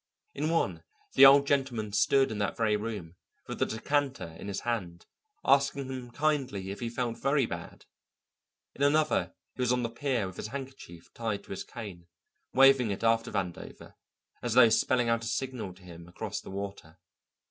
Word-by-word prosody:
In 155 - -1
one 165 0 0 0.3
the 135 - +10
Old 140 +1 +7
Gentleman 130 -7 0
stood 135 +5 +3
in 105 - -4
that 100 - -1
very 110 -2 +2
room, 105 -6 -5 0.3
with - - -6
the - - +2
decanter 135 - -2
in - - -7
his 100 - -3
hand, 95 -8 -3 0.4
asking 140 0 +3
him 130 -2 -6
kindly 130 -9 -1
if 100 - -7
he 120 - -3
felt 120 -1 -3
very 135 -1 +2
bad; - - -8 0.9
in - - -11
another 150 +2 +2 0.2
he - - -6
was 125 -1 +2
on 125 -1 +1
the 115 - -1
pier 125 -3 -1
with 95 -1 -8
his - - -4
handkerchief 130 -9 -9
tied 110 -3 -3
to - - -14
his 95 - -4
cane, 90 -6 -9 0.4
waving 135 -3 +6
it 100 +2 -4
after 115 0 +2
Vandover 90 -3 -5 0.5
as 120 -2 -2
though 120 -2 +8
spelling 120 +2 +2
out 115 0 +1
a - - -4
signal 125 -3 -3
to 95 - -19
him 85 -1 -11
across 85 - -5
the - - -11
water. 100 -4 -7
115 Hz, 180 wpm, -29 LUFS, 100-135 Hz, 0.9 s, the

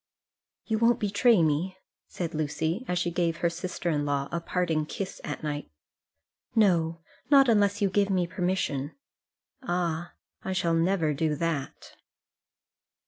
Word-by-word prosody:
"You 220 -1 0
won't 235 0 +4
betray 205 -1 +4
me," 160 +5 0 0.3
said 170 -2 -4
Lucy, 160 - -1
as 180 - 0
she 175 -1 0
gave 170 -1 0
her 170 0 +1
sister 175 0 -3
in 145 -2 0
law 140 -1 -1
a 170 - -1
parting 165 -3 -1
kiss 195 +3 -5
at 150 - -5
night. 150 -1 -3 0.9
"No; 170 -6 +3 0.3
not 275 -2 +7
unless 205 -2 +3
you 200 - +3
give 200 0 +2
me 185 -2 +2
permission." 175 -6 -2 0.7
"Ah; 175 -6 -2 0.3
I 190 - -2
shall 170 -2 +1
never 165 -2 +2
do 150 +1 0
that." 155 -4 -4
175 Hz, 140 wpm, -28 LUFS, 160-195 Hz, 0.9 s, not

